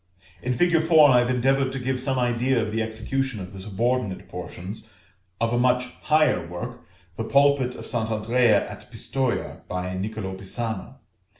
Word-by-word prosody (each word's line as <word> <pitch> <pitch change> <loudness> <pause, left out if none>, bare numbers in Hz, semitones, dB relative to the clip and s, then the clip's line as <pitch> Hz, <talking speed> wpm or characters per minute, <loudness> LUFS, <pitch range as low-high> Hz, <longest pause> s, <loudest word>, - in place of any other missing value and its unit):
In 125 - -1
fig. 170 +5 +3
4 160 -2 +6
I 125 - +6
have 120 0 +1
endeavored 130 +1 +2
to - - -3
give 130 0 -2
some 130 0 0
idea 125 +1 +1
of 110 -2 -1
the 115 +1 0
execution 110 +3 -2
of 90 0 -8
the 95 - -8
subordinate 105 +1 -1
portions 100 +5 -7 0.5
of 115 +1 +1
a 120 - +2
much 125 0 +2
higher 155 - +3
work, 85 +1 -6 0.4
the 115 - -2
pulpit 140 0 +3
of - - -8
St. 110 -1 -2
Andrea 115 +2 +3
at - - -11
Pistoja, 130 -3 -2
by 90 0 -3
Nicolo 100 0 -4
Pisano. 110 +4 -5
120 Hz, 170 wpm, -25 LUFS, 110-130 Hz, 0.5 s, 4